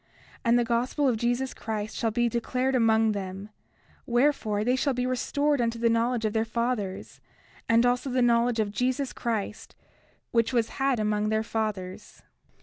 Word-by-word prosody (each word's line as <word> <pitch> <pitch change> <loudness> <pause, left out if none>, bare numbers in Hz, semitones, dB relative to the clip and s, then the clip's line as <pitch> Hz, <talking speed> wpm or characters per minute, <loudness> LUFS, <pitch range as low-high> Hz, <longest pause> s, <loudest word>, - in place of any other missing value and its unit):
30:5 - - -38 0.4
And 235 +1 +4
the 240 - +3
gospel 245 +5 0
of 250 - +2
Jesus 245 +3 -1
Christ 215 -1 -4
shall 230 - 0
be 240 +2 +1
declared 250 +3 -1
among 225 -3 +3
them; 195 0 -5 0.6
wherefore, 240 -4 +1
they 250 +3 +2
shall 265 0 0
be 250 0 -1
restored 285 +2 0
unto 230 0 -1
the 230 0 +2
knowledge 230 0 +1
of 215 - 0
their 220 -1 +2
fathers, 225 -4 -3 0.5
and 230 +1 +5
also 245 +2 +1
to - - -4
the 255 - +3
knowledge 235 0 +2
of 210 -2 0
Jesus 255 +5 -1
Christ, 220 -3 -4 0.6
which 230 +2 +1
was 230 -2 +1
had 270 -3 +2
among 210 0 0
their 220 0 +1
fathers. 210 -5 -4
235 Hz, 175 wpm, -27 LUFS, 220-250 Hz, 0.6 s, and